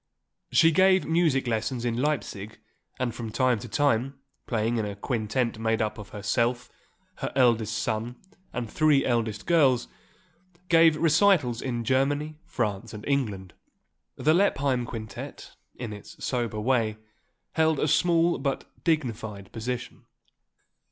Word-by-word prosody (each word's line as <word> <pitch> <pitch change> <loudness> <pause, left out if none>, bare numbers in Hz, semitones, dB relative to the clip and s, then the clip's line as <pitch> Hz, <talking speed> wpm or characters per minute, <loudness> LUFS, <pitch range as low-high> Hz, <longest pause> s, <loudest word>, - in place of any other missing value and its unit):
She 165 0 +5
gave 190 +3 +4
music 160 -5 +2
lessons 115 +1 -2
in 120 -1 0
Leipsig 120 -6 -2 0.4
and 125 -2 -1
from 115 -2 -6
time 125 +1 +1
to 120 - -8
time, 135 +2 0 0.3
playing 115 0 0
in 110 - 0
a 100 - -5
quintet 115 +2 -2
made 110 0 0
up 110 -1 -2
of 105 -1 -9
herself, 120 +4 -1 0.5
her - - -4
eldest 115 -4 +3
son 115 +2 -2 0.4
and 125 -2 -3
three 150 +3 +3
eldest 115 -4 -1
girls, 140 -8 +3 0.8
gave 165 -2 +6
recitals 160 - +3
in 120 -3 -2
Germany, 145 +4 0
France 115 -7 -3
and 105 - -9
England. 105 -10 -1 0.6
The 155 - +2
Lippheim 140 -9 +2
quintet, 110 -3 -8 0.2
in 120 -4 -6
its 105 - -9
sober 120 -4 -1
way, 110 -2 +1 0.5
held 160 -1 +2
a - - +1
small 170 +2 +3
but 140 -2 -2 0.2
dignified 110 - -2
position. 120 +1 -5
125 Hz, 130 wpm, -27 LUFS, 110-145 Hz, 0.8 s, gave